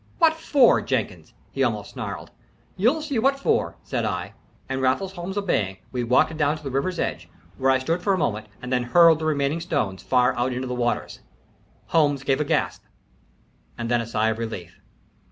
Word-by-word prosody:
"What 325 Hz, -2 st, +5 dB
for, 290 Hz, -5 st, +4 dB
Jenkins?" -, -, -3 dB, 0.2 s
he -, -, -3 dB
almost -, -, 0 dB
snarled. -, -, -6 dB, 0.4 s
"You'll 250 Hz, +11 st, +2 dB
see 285 Hz, -6 st, -1 dB
what 275 Hz, +4 st, +2 dB
for," -, -, +1 dB
said -, -, -2 dB
I. -, -, -3 dB, 0.3 s
And 130 Hz, 0 st, -2 dB
Raffles 160 Hz, +9 st, +1 dB
Holmes 190 Hz, +2 st, -6 dB
obeying, 105 Hz, -, 0 dB
we 125 Hz, -2 st, -2 dB
walked 125 Hz, +6 st, +3 dB
down 150 Hz, 0 st, +1 dB
to -, -, -15 dB
the 135 Hz, -, -4 dB
river's 155 Hz, +8 st, -1 dB
edge, -, -, -3 dB, 0.3 s
where 135 Hz, -, +2 dB
I 130 Hz, -, +5 dB
stood 165 Hz, +7 st, -1 dB
for 200 Hz, -, +1 dB
a 190 Hz, -, +2 dB
moment, 110 Hz, -, -1 dB, 0.2 s
and 125 Hz, +1 st, -3 dB
then 125 Hz, -, +2 dB
hurled 165 Hz, +5 st, +5 dB
the 160 Hz, -, -3 dB
remaining 145 Hz, 0 st, 0 dB
stones 140 Hz, -, -2 dB
far 125 Hz, 0 st, +2 dB
out 125 Hz, +1 st, 0 dB
into 130 Hz, +1 st, -3 dB
the 125 Hz, -, -3 dB
waters. 120 Hz, -1 st, -2 dB, 0.7 s
Holmes 145 Hz, -4 st, +2 dB
gave 135 Hz, +1 st, +1 dB
a -, -, 0 dB
gasp -, -, 0 dB, 1.0 s
and 120 Hz, 0 st, -3 dB
then 120 Hz, -1 st, +3 dB
a 115 Hz, -, -6 dB
sigh 110 Hz, -1 st, +1 dB
of 110 Hz, -, -5 dB
relief. 100 Hz, -7 st, -6 dB
140 Hz, 195 wpm, -24 LUFS, 125-180 Hz, 1.0 s, What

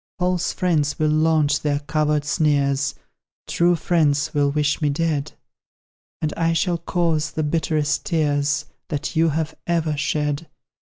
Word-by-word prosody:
False 180 Hz, -1 st, 0 dB
friends 160 Hz, -6 st, 0 dB
will 155 Hz, -1 st, +1 dB
launch 155 Hz, -1 st, +2 dB
their 145 Hz, -1 st, 0 dB
covert 150 Hz, 0 st, 0 dB
sneers; 140 Hz, -3 st, +1 dB, 0.5 s
True 175 Hz, +1 st, +2 dB
friends 155 Hz, -3 st, +1 dB
will 145 Hz, -1 st, +2 dB
wish 150 Hz, +1 st, 0 dB
me 150 Hz, -, +2 dB
dead; 150 Hz, -1 st, -1 dB, 0.9 s
And 150 Hz, -, 0 dB
I 165 Hz, 0 st, +1 dB
shall 170 Hz, 0 st, 0 dB
cause 165 Hz, -3 st, 0 dB
the 155 Hz, +1 st, -3 dB
bitterest 155 Hz, -1 st, 0 dB
tears 145 Hz, -3 st, +1 dB, 0.2 s
That 150 Hz, +2 st, -4 dB
you 165 Hz, +1 st, +3 dB
have 160 Hz, +1 st, -2 dB
ever 165 Hz, -3 st, 0 dB
shed. 150 Hz, +1 st, -1 dB
155 Hz, 135 wpm, -22 LUFS, 145-165 Hz, 0.9 s, you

